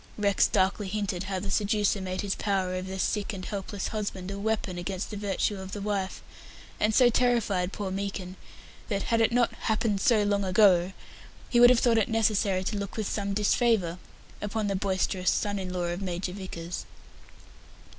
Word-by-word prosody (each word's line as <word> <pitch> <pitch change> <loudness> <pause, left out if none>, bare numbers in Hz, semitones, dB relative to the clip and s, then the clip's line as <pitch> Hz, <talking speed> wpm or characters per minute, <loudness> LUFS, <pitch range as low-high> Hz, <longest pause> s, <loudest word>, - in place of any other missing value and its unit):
Rex 200 -2 +3
darkly 195 +2 +1
hinted 195 -2 -2
how 190 0 -2
the 195 +1 -4
seducer 205 -1 +1
made 185 0 -3
his 200 -1 -1
power 195 -3 -1
over 185 0 -4
the 190 - -4
sick 210 +3 -1
and 185 -2 -6
helpless 200 -1 -4
husband 200 -3 -4
a 200 - -5
weapon 205 -4 -1
against 185 +3 -4
the - - -5
virtue 200 0 -1
of 190 0 -8
the 205 - -4
wife 200 -2 -3 0.6
and 215 0 +2
so 250 -2 +6
terrified 225 -7 +1
poor 200 -2 -4
Meekin 195 -1 -4 0.5
that, 200 -3 -1
had 230 -1 +1
it 225 - +3
not 240 0 +2
"happened 215 -2 0
so 220 -4 +4
long 205 0 +1
ago", 185 -1 +4 0.6
he 240 - +4
would 245 0 +9
have 245 -2 +4
thought 230 -2 +4
it 215 - 0
necessary 210 -4 +1
to 205 +2 -2
look 200 +1 -5
with 215 -2 -1
some 200 -1 -2
disfavour 205 -4 +2 0.4
upon 210 +1 -2
the 200 -1 0
boisterous 190 -1 0
son 205 -1 0
in 185 -1 -4
law 180 -1 -2
of 175 +2 -2
Major 180 -1 -3
Vickers. 180 -3 -6
200 Hz, 185 wpm, -28 LUFS, 185-210 Hz, 0.6 s, would